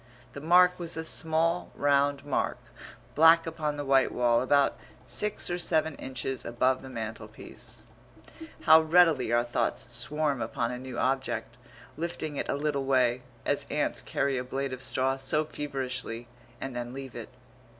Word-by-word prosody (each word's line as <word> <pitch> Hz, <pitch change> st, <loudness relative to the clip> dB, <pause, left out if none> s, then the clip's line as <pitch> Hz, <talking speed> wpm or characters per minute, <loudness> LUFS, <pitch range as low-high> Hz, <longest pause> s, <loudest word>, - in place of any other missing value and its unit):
The 140 Hz, -, -8 dB
mark 180 Hz, +3 st, +5 dB
was 170 Hz, -1 st, -4 dB
a 160 Hz, -, -2 dB
small 160 Hz, +2 st, 0 dB
round 140 Hz, 0 st, +2 dB
mark, 145 Hz, -, -1 dB, 0.6 s
black 165 Hz, +2 st, +6 dB
upon 155 Hz, -2 st, -3 dB
the 145 Hz, -, -4 dB
white 135 Hz, -1 st, +3 dB
wall, 120 Hz, -1 st, +2 dB
about 140 Hz, +2 st, +2 dB, 0.3 s
six 210 Hz, 0 st, -2 dB
or 175 Hz, 0 st, -2 dB
seven 160 Hz, -2 st, +1 dB
inches 130 Hz, 0 st, -4 dB
above 130 Hz, +2 st, +1 dB
the 130 Hz, -, -10 dB
mantelpiece. 115 Hz, -3 st, -7 dB, 0.8 s
How 160 Hz, +1 st, +7 dB
readily 160 Hz, -6 st, +4 dB
our 120 Hz, 0 st, +3 dB
thoughts 120 Hz, 0 st, -2 dB
swarm 150 Hz, -4 st, 0 dB
upon 115 Hz, +1 st, -2 dB
a 125 Hz, -, -5 dB
new 130 Hz, -2 st, -7 dB
object, 130 Hz, +2 st, -1 dB, 0.4 s
lifting 160 Hz, -2 st, -4 dB
it -, -, -3 dB
a -, -, +1 dB
little 140 Hz, -1 st, -1 dB
way, 130 Hz, -2 st, +2 dB, 0.2 s
as -, -, 0 dB
ants -, -, -1 dB
carry 135 Hz, -2 st, -1 dB
a -, -, -3 dB
blade 135 Hz, +1 st, -3 dB
of 130 Hz, -, -6 dB
straw 130 Hz, +1 st, 0 dB
so 145 Hz, +3 st, +1 dB
feverishly, 130 Hz, -5 st, -4 dB, 0.3 s
and 135 Hz, -2 st, -5 dB
then 120 Hz, 0 st, -4 dB
leave 135 Hz, -2 st, -7 dB
it.... -, -, -8 dB
135 Hz, 160 wpm, -28 LUFS, 130-155 Hz, 0.8 s, How